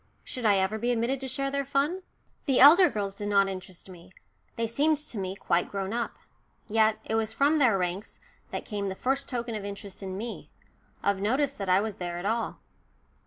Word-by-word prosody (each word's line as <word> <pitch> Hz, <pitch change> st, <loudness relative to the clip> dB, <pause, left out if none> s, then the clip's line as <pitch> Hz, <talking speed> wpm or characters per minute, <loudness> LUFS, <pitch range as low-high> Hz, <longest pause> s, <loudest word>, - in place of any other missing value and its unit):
Should 250 Hz, -3 st, -6 dB
I 200 Hz, -2 st, +5 dB
ever 190 Hz, +3 st, 0 dB
be 240 Hz, +2 st, -1 dB
admitted 240 Hz, +3 st, 0 dB
to 265 Hz, -, -5 dB
share 275 Hz, +2 st, -2 dB
their 280 Hz, 0 st, 0 dB
fun? 280 Hz, +7 st, 0 dB, 0.5 s
The 265 Hz, -3 st, +3 dB
elder 335 Hz, +7 st, +9 dB
girls 200 Hz, -2 st, -3 dB
did 205 Hz, +1 st, -5 dB
not 200 Hz, -1 st, +4 dB
interest 185 Hz, -1 st, -7 dB
me. 180 Hz, -1 st, -13 dB, 0.4 s
They 230 Hz, -, -1 dB
seemed 295 Hz, +7 st, +2 dB
to 295 Hz, -6 st, -6 dB
me 190 Hz, 0 st, -3 dB
quite 175 Hz, -3 st, 0 dB
grown 195 Hz, +1 st, -3 dB
up. 235 Hz, 0 st, -2 dB, 0.5 s
Yet 220 Hz, 0 st, +3 dB
it -, -, -3 dB
was 220 Hz, 0 st, 0 dB
from 285 Hz, +6 st, +3 dB
their 240 Hz, -8 st, +4 dB
ranks 185 Hz, +3 st, -3 dB, 0.3 s
that -, -, -5 dB
came 200 Hz, -2 st, -3 dB
the 190 Hz, -, -4 dB
first 270 Hz, +6 st, -1 dB
token 240 Hz, -2 st, -3 dB
of 210 Hz, -2 st, -4 dB
interest 200 Hz, -1 st, -7 dB
in 190 Hz, -1 st, -5 dB
me 230 Hz, +3 st, -6 dB, 0.5 s
of 200 Hz, -1 st, +1 dB
notice 265 Hz, +7 st, +1 dB
that 195 Hz, -7 st, -5 dB
I 185 Hz, +2 st, +5 dB
was 215 Hz, -2 st, -4 dB
there 175 Hz, -1 st, -4 dB
at 175 Hz, -, -6 dB
all. 225 Hz, +2 st, -1 dB
220 Hz, 210 wpm, -28 LUFS, 195-260 Hz, 0.5 s, elder